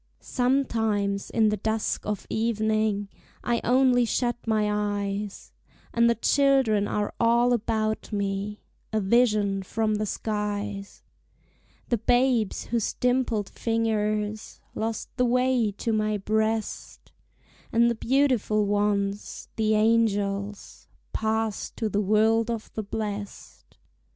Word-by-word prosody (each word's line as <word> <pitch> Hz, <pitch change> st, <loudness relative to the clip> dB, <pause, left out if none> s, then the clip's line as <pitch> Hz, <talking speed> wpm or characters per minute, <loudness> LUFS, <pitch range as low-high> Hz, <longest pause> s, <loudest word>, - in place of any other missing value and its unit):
Sometimes, 225 Hz, -6 st, 0 dB
in 220 Hz, -2 st, +3 dB
the 210 Hz, -, 0 dB
dusk 220 Hz, +2 st, -2 dB
of 210 Hz, -2 st, -3 dB
evening, 220 Hz, -2 st, 0 dB, 0.4 s
I 235 Hz, -1 st, 0 dB
only 250 Hz, 0 st, +4 dB
shut 240 Hz, +1 st, 0 dB
my 215 Hz, -1 st, +2 dB, 0.4 s
eyes, 200 Hz, 0 st, -5 dB, 0.4 s
And 235 Hz, 0 st, +4 dB
the 235 Hz, -, +3 dB
children 260 Hz, -5 st, +3 dB
are 205 Hz, 0 st, -2 dB
all 235 Hz, +1 st, +4 dB
about 220 Hz, -1 st, -1 dB
me, 200 Hz, 0 st, -3 dB, 0.3 s
A 220 Hz, -, +1 dB
vision 210 Hz, -2 st, +2 dB
from 215 Hz, +3 st, -1 dB
the 210 Hz, 0 st, -1 dB
skies: 205 Hz, -1 st, -4 dB, 0.9 s
The 235 Hz, -, +1 dB
babes 245 Hz, -2 st, +2 dB
whose 230 Hz, -2 st, -1 dB
dimpled 245 Hz, -5 st, 0 dB
fingers 215 Hz, -2 st, -1 dB
Lost 225 Hz, 0 st, -3 dB
the 250 Hz, -, +3 dB
way 250 Hz, -2 st, +2 dB
to 225 Hz, +3 st, -2 dB
my 215 Hz, -1 st, +1 dB
breast, 220 Hz, +2 st, -2 dB, 0.6 s
And 235 Hz, +1 st, +4 dB
the 235 Hz, -, +2 dB
beautiful 235 Hz, -4 st, +1 dB
ones, 205 Hz, 0 st, -1 dB
the 215 Hz, -1 st, +2 dB
angels, 205 Hz, -2 st, 0 dB, 0.3 s
Passed 220 Hz, -1 st, -2 dB
to 220 Hz, -, -1 dB
the 205 Hz, +1 st, 0 dB
world 220 Hz, +3 st, +3 dB
of 230 Hz, -2 st, -4 dB
the 220 Hz, -, -3 dB
blest. 205 Hz, -1 st, -6 dB
220 Hz, 115 wpm, -26 LUFS, 205-235 Hz, 0.9 s, only